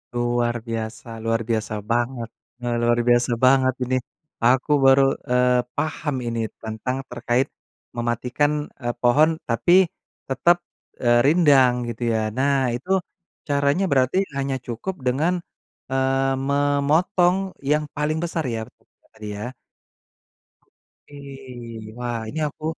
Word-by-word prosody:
Luar 120 0 +1
biasa. 115 0 -5 0.2
Luar 115 0 +1
biasa 110 -1 -1 0.2
banget, 120 0 -1 0.5
luar 120 0 +3
biasa 120 0 +3
banget 130 0 +4
ini. 125 +1 0 0.5
Aku 130 +4 +3
baru, 135 +1 +7 0.3
eee, 125 0 +3 0.2
paham 155 -2 -2
ini 115 0 -2 0.2
tentang 110 +3 -3
terkait, 125 +2 0 0.5
mematikan, 125 +6 -1
eee, 120 -2 -2
pohon 140 +6 +5 0.2
tapi 175 +11 +5 0.5
tetap, 175 +6 +3 0.5
eee, 120 0 +5
rindang 140 -5 +5 0.2
gitu 120 - -5
ya. 110 -1 0
Nah, 135 +1 +1
itu 130 +10 -6 0.6
caranya 140 +5 +2
berarti 130 +4 +2 0.2
hanya 135 -1 -1
cukup 125 +11 -4
dengan, 150 +8 +2 0.6
eee, 135 0 +1 0.2
memotong 145 +6 +2 0.2
yang 150 +2 +1
paling 150 +2 0
besar 165 -1 -2
ya, 110 - -3 0.5
tadi 110 -1 -10
ya? 105 +5 -5 1.6
Ih, 125 -6 -9
wah 120 -1 -3
ini 160 - -4
aku 150 +1 -9
130 Hz, 115 wpm, -23 LUFS, 120-145 Hz, 1.6 s, baru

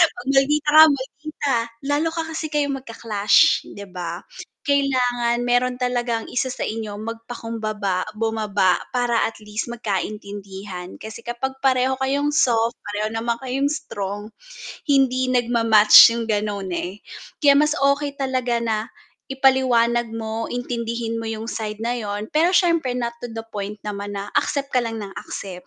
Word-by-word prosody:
pag 245 - -10
maldita 280 +2 +3
ka 310 +1 +10
maldita, 280 +1 -3 0.3
lalo 295 +3 +1
ka 330 - -1
kasi 315 0 -3
kayong 285 -2 0
mag-clash, 215 -4 +3
'di 200 0 -10
ba? 175 0 -5 0.4
Kailangan 250 -4 +1
meron 245 +1 +1
talagang 240 -2 -1
isa 260 +1 -1
sa - - -8
inyo 220 -1 -4
magpakumbaba, 225 -4 -3
bumaba, 215 -4 +1 0.2
para 245 -2 +2
at 225 - -7
least 210 0 -4
magkaintindihan 200 -3 -5
kasi 220 +1 -8
kapag 250 +3 -4
pareho 260 -1 +2
kayong 280 +2 +1
soft 235 -5 +2
pareho 210 +1 -2
naman 230 +1 -1
kayong 270 +2 0
strong, 205 -9 -5 0.6
hindi 260 -2 +3
nag-ma-match 230 -3 +7
'yong 235 -1 -3
gano'n 205 -2 -1
eh, 185 +4 -4 0.4
kaya 280 -1 +6
mas 300 +1 +3
okey, 280 0 +1
talaga 255 -3 -1
na 220 -2 0 0.5
ipaliwanag 250 -3 +2
mo 225 0 -3
intindihin 235 -2 -3
mo 225 - -5
'yong 225 +1 -4
side 215 -1 -5
na 235 +1 0
'yon 210 0 -4
pero 325 +3 +3
siyempre 335 -8 +2
not 240 -1 -1
to 245 - -6
the 225 - -4
point 205 0 -4
naman 205 -1 -5
na 200 +1 -5
accept 280 -1 -2
ka 255 - +3
lang 225 -1 -4
ng 200 - -7
accept, 180 -2 -8
235 Hz, 145 wpm, -22 LUFS, 210-265 Hz, 0.6 s, ka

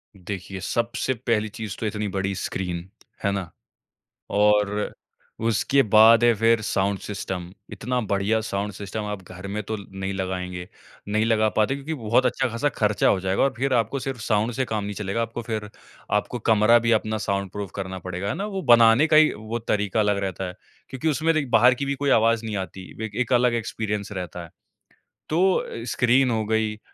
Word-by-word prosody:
देखिए, 95 0 -6
सबसे 115 +7 -1
पहली 110 -2 +1
चीज़ 105 -2 -6
तो 110 - -3
इतनी 105 0 -2
बड़ी 95 0 -2
स्क्रीन, 90 -1 -4 0.3
है 100 - +2
ना? 95 -4 -3 0.8
और 105 0 +2 0.5
उसके 125 +5 +3
बाद 110 +2 +6
है 120 -1 +6
फिर 115 +1 +3
साउंड 100 -1 0
सिस्टम, 95 -3 -5 0.2
इतना 125 +5 -2
बढ़िया 100 +3 +2
साउंड 105 -1 -3
सिस्टम 105 +2 -5
आप 105 -2 -4
घर 90 +2 -8
में 105 +2 -3
तो 110 +2 -3
नहीं 95 -1 -6
लगाएँगे 90 -1 -4 0.4
नहीं 110 +2 +1
लगा 110 -1 +3
पाते 110 +6 +2
क्योंकि 140 +3 -5
बहुत 120 -1 +1
अच्छा 130 +1 +1
खासा 115 +6 0
खर्चा 105 -4 +1
हो 95 - +3
जाएगा 95 +4 +1
और 135 -1 +2
फिर 135 +1 0
आपको 120 +3 +1
सिर्फ 135 -2 -4
साउंड 110 +2 +1
से 130 +1 -1
काम 110 -3 -2
नहीं 100 0 -4
चलेगा। 100 +2 -2
आपको 115 +1 -4
फिर 110 -2 -4 0.4
आपको 105 +4 0
कमरा 110 +2 +5
भी 115 0 +1
अपना 110 0 +1
साउंड 100 -2 -2
प्रूफ 100 -2 -5
करना 95 -1 -5
पड़ेगा, 90 +2 -5
है - - 0
ना? 200 +3 -3
वो 195 -2 -4
बनाने 120 +3 +6
का 155 - +3
ही 155 0 +6
वो 110 +2 -5
तरीका 105 -1 -1
अलग 105 -1 +2
रहता 95 0 -3
है। 90 - -8 0.3
क्योंकि 135 +4 -3
उसमें 160 +2 +1
देख 150 -4 0
बाहर 120 +3 +6
की 140 +2 -4
भी 140 0 -1
कोई 140 +1 -1
आवाज 115 0 +3
नहीं 110 - -3
आती, 95 0 -6 0.2
ए 110 - -5
एक 125 - 0
अलग 125 -1 +4
एक्सपीरियंस 105 -2 -3
रहता 90 -3 -5
है। 85 - -12 0.8
तो 170 -8 +1
स्क्रीन 125 +3 +3
हो 110 -1 0
गयी, 110 0 0
110 Hz, 195 wpm, -24 LUFS, 100-120 Hz, 0.8 s, बाद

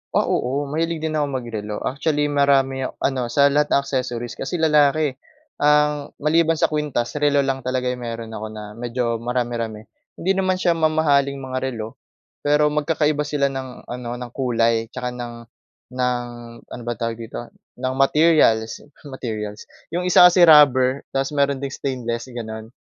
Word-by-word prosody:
Ah, - - +4
oo 135 +4 -1
mahilig 165 +1 -2
din 160 - -1
akong 145 -2 -1
mag-relo. 110 -4 -5
Actually, 145 +2 0
marami 135 -2 +2
ak - - -12
ano 130 -3 0
sa 140 +3 +3
lahat 150 +1 +2
ng 140 - +4
accessories 125 -3 -3
kasi - - -3
lalaki, 150 -2 +3 0.5
ang 150 0 +2
maliban 165 +1 +3
sa 155 - +1
kwintas 150 -6 -1
relo 145 -1 +3
lang 135 -1 -1
talaga 130 0 -1
yung 125 -1 -6
meron 115 -1 -6
ako 110 0 -5
na, 110 0 -8
medyo 120 0 -2
marami-rami. 115 -2 -3 0.3
Hindi 185 - 0
naman 185 -1 +1
siya 180 -1 +1
mamahaling 150 -3 +2
mga 130 0 -4
relo, 115 -4 -5 0.4
pero 150 +1 +2
magkakaiba 150 0 0
sila 140 -2 0
ng 130 -2 -7
ano, 120 -1 -7
ng 125 -1 -7
kulay 115 -3 +1
'tsaka 125 +1 -5
ng 120 -1 -6 0.6
ng 125 -1 -1 0.5
ano 120 - -7
ba 120 - 0
tawag 115 -1 -3
dito 115 +1 -6 0.3
ng 130 +1 -2
materials, 135 -7 +3 0.3
materials 105 -5 -5 0.3
'yong 180 +1 -2
isa 180 - +7
kasi 175 0 +6
rubber 135 -3 +6
tapos 135 +2 -1
meron 140 -1 +2
ding 140 -1 -4
stainless 120 -2 -4
gano'n. 110 -2 -7
135 Hz, 160 wpm, -21 LUFS, 120-150 Hz, 0.6 s, isa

